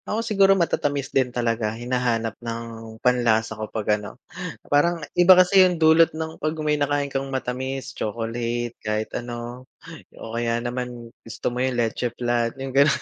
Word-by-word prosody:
Ako 225 +2 -1
siguro 195 -3 +4
matatamis 145 -5 -1
din 130 -2 +2
talaga 115 -3 -1
hinahanap 120 -2 -1
ng 115 -1 -7
panlasa 115 -3 +2
ko 110 0 -6
pag 105 -1 0
ano. 105 - -9 0.5
Parang 170 +4 +2 0.2
iba 180 +1 +7
kasi 185 +1 +6
yung 180 -2 +4
dulot 160 +1 +6
ng 160 0 -5
'pag 155 +1 -1
may 150 - +2
nakain 145 -1 +1
kang 135 0 -2
matamis, 130 +1 -4
chocolate 115 +1 -3
kahit 110 0 -2
ano. 120 +1 -6 0.5
O 115 - -8
kaya 115 0 0
naman 120 -1 -5
gusto 115 +2 -4
mo 125 - -2
yung 130 -1 0
leche 120 +1 0
flan 120 -1 +1
yung 135 -1 -5
ganun. 140 +2 +4
125 Hz, 160 wpm, -23 LUFS, 115-145 Hz, 0.5 s, iba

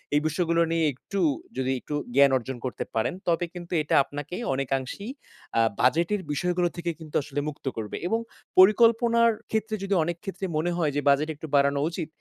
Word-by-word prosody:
এই 150 - +4
বিষয়গুলো 170 +1 +1
নিয়ে 165 -1 +2
একটু 195 +9 -6 0.4
যদি 130 0 0
একটু 150 - -5 0.2
জ্ঞান 140 0 +6
অর্জন 130 +1 -6
করতে 125 - -3
পারেন 110 - +1
তবে 175 +1 +2
কিন্তু 175 -1 -8
এটা - - 0
আপনাকে 145 +4 -7 0.2
অনেকাংশেই 135 - -3 0.5
আ - - +6 0.2
বাজেটের 170 +10 +2
বিষয়গুলো 175 +3 +1
থেকে 170 0 -2
কিন্তু 155 -2 -11
আসলে 145 -1 -4
মুক্ত 150 -1 -7
করবে। 110 -2 -4
এবং 225 +4 +1 0.4
পরিকল্পনার 230 +3 +6 0.2
ক্ষেত্রে 220 0 -1
যদি 195 0 -1
অনেক 170 +1 -3
ক্ষেত্রে 195 -1 -5
মনে 175 +3 0
হয় 160 -4 +1
যে 145 - +1
বাজেট 145 +3 +3
একটু 155 +2 -8
বাড়ানো 140 0 +3
উচিত, 170 -2 -4
165 Hz, 175 wpm, -26 LUFS, 140-190 Hz, 0.5 s, জ্ঞান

